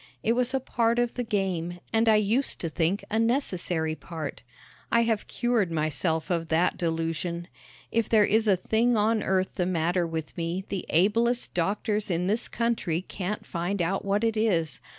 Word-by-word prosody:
It 230 - +3
was 250 +1 +1
a 265 - +1
part 235 -2 0
of 240 -1 +1
the 245 - -2
game 185 -6 -2
and 225 0 +4
I 220 - +6
used 215 +6 +2
to 165 - -2
think 170 +5 0
a 220 - +1
necessary 185 - 0
part. 160 -2 -6 0.5
I 235 - +5
have 225 -2 0
cured 235 -7 0
myself 160 +1 -1
of 165 -2 0
that 165 +3 +2
delusion. 165 0 -2 0.4
If 230 -1 0
there 215 -2 +5
is 220 +2 +2
a 200 - +5
thing 225 +6 +1
on 215 +1 +2
earth 190 0 0
the 180 -3 -1
matter 175 0 +1
with 160 -1 -5
me 170 +2 -3
the 195 -2 -4
ablest 230 +8 +2
doctors 205 +4 -1
in 175 0 0
this 215 +5 0
country 220 -8 -1
can't 195 +2 -5
find 175 +3 -2
out 180 +3 0
what 200 +2 0
it 225 -1 +1
is. 185 -8 +1
195 Hz, 180 wpm, -27 LUFS, 170-225 Hz, 0.5 s, I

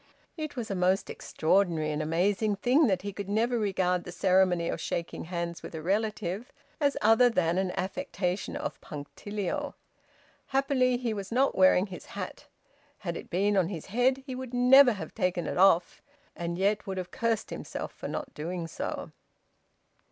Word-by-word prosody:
It 310 -2 -5
was 230 -4 -4
a - - -1
most 185 +1 +1
extraordinary 165 -3 +1
and 150 +1 -2
amazing 195 +7 +1
thing 250 +9 +3
that 190 -3 0
he 200 0 -4
could 200 0 -6
never 230 +3 +1
regard 185 -3 +1
the 180 - -8
ceremony 180 -1 +3
of - - -3
shaking 170 0 -3
hands 170 -1 -4
with - - -8
a 160 - -5
relative 210 +2 -1 0.3
as 285 -2 +2
other 225 +3 +6
than 180 -5 +1
an 190 -1 0
affectation 185 0 -2
of - - -5
punctilio. 205 - -5 0.7
Happily 265 -2 +2
he 240 -3 -2
was 200 -1 -6
not 265 +4 +2
wearing 185 0 +5
his 190 -3 -10
hat; - - -6 0.5
had 170 -5 -4
it - - -8
been 200 +4 +1
on 185 -4 +3
his 170 -5 -6
head 260 +3 +2
he 265 - -5
would 255 -1 -6
never 250 +1 +7
have 200 - -7
taken 180 -2 0
it - - -2
off, 180 -2 +4 0.3
and 170 0 -3
yet 200 +2 +1
would 190 -1 -3
have 180 -1 -5
cursed 230 -2 -1
himself - - -5
for - - -7
not 275 -3 -5
doing 170 +3 -4
so. 165 - -5
195 Hz, 175 wpm, -29 LUFS, 180-235 Hz, 0.7 s, never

